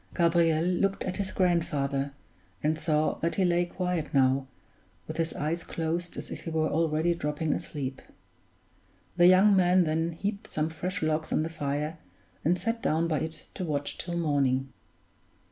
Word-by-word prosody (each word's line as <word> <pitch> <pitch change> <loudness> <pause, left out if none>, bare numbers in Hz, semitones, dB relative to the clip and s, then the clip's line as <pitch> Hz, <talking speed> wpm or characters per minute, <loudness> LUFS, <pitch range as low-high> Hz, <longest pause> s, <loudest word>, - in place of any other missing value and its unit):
Gabriel 170 -2 +3
looked 190 +2 +1
at 185 - -3
his 195 -2 -2
grandfather, 145 -6 0 0.5
and 155 +1 +1
saw 155 0 +1
that 165 +1 -1
he 190 - +2
lay 175 0 +2
quiet 180 -3 -2
now, 135 0 +3 0.6
with 155 - -6
his 165 -1 0
eyes 165 +3 -2
closed 170 +1 -3
as - - -6
if - - -6
he - - -3
were 160 -1 +1
already 160 +1 +2
dropping 150 -1 -1
asleep. 135 -2 -4 1.2
The 175 0 +7
young 190 +3 +6
man 180 0 +5
then 165 +1 0
heaped 200 +5 -4
some 155 +1 -1
fresh 180 +2 -3
logs 155 0 0
on - - +2
the 160 - -3
fire, 150 +1 -3 0.4
and 175 +3 +3
sat 230 +3 -2
down 160 +2 +1
by 155 -3 0
it 160 -1 -5
to - - -4
watch 145 -4 -2
till 175 0 -3
morning. 135 -5 +1
165 Hz, 165 wpm, -28 LUFS, 150-175 Hz, 1.2 s, The